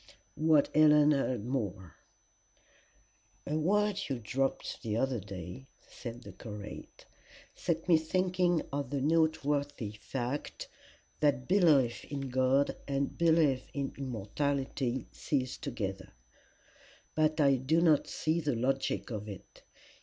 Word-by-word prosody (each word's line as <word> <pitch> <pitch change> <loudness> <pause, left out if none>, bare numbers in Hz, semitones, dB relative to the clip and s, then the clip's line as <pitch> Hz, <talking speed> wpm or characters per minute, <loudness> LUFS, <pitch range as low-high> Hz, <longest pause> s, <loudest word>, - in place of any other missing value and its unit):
WHAT 155 -2 +3
HELEN 150 -1 +6
HEARD 130 -6 0
MORE 100 - -3 1.5
"A 150 - -2
word 205 +5 +2
you 135 - -1
dropped 130 +4 -2
the 110 -3 -2
other 130 -1 0
day," 95 +6 -8 0.2
said 120 0 -8
the 100 - -9
curate, 105 +1 -9 0.5
"set 165 -1 -2
me 170 -3 +6
thinking 180 +1 +1
of 140 -3 -2
the 140 0 -1
note 160 +2 +2
worthy 145 -6 -1
fact 125 +5 -5 0.5
that 140 -4 +2
belief 155 -11 +4
in 140 -2 -5
God 130 +2 +2
and 140 0 -1
belief 160 -6 +3
in 140 -1 -2
immortality 130 +2 -2
cease 130 -3 -2
together. 100 -8 -5 1.0
But 155 0 +1
I 140 -2 +5
do 140 +6 +2
not 160 -4 +4
see 160 +2 0
the 145 -4 0
logic 135 +2 -1
of 105 -1 -5
it. 100 - -11
135 Hz, 125 wpm, -31 LUFS, 120-155 Hz, 1.5 s, HELEN